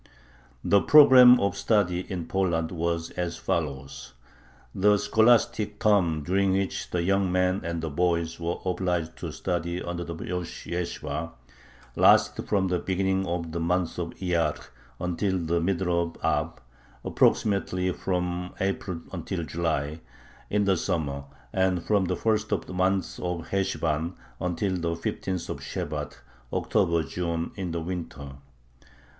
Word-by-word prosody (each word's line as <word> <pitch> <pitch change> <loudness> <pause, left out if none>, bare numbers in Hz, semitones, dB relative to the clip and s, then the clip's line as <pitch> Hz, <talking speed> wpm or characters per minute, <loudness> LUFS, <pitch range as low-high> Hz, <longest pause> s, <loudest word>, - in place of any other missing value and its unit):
The 100 -1 +4
program 125 -4 +8
of 100 -1 0
study 100 -5 +1
in 90 -3 -3
Poland 85 -3 0
was 85 -1 -2
as 85 -2 -3
follows: 70 -4 -3 0.6
The 105 +2 +4
scholastic 110 -1 +2
term 95 -8 +2
during 95 +4 +2
which 95 0 -1
the 85 -1 -1
young 95 0 +2
men 90 +1 +1
and 85 -1 -3
the 80 - -2
boys 85 +1 0
were 85 +1 -2
obliged 90 -3 -1
to - - -5
study 85 -1 -2
under 85 -1 -4
the 85 -1 -6
rosh 90 +1 -5
yeshibah 85 -2 -4 0.6
lasted - - +4
from 100 -2 +2
the 90 -1 +1
beginning 95 +1 0
of 85 -1 -3
the 85 - -3
month 90 0 0
of 85 -1 -4
Iyyar 85 -5 0 0.4
until 95 +2 -1
the 85 0 0
middle 90 -1 +1
of 85 -1 -4
Ab 65 - 0 0.5
[approximately 95 -3 +2
from 90 -1 -2
April 95 -3 -2
until 85 -3 -4
July] 80 -2 -2 0.5
in 105 0 +1
the 95 -2 +3
summer 70 -4 -2 0.3
and 95 -2 +1
from 100 -3 +2
the - - -1
first 110 -1 0
of - - 0
the - - -8
month 95 +1 0
of 90 -2 -4
Heshvan 80 -3 -1 0.2
until 90 +2 -1
the 85 -1 -1
fifteenth 90 +1 -3
of - - -5
Shebat - - -5 0.3
[October 85 -1 +1
June] 85 +2 -3
in 95 -3 -4
the 85 0 -3
winter. 80 -6 -6
90 Hz, 140 wpm, -27 LUFS, 85-95 Hz, 0.6 s, program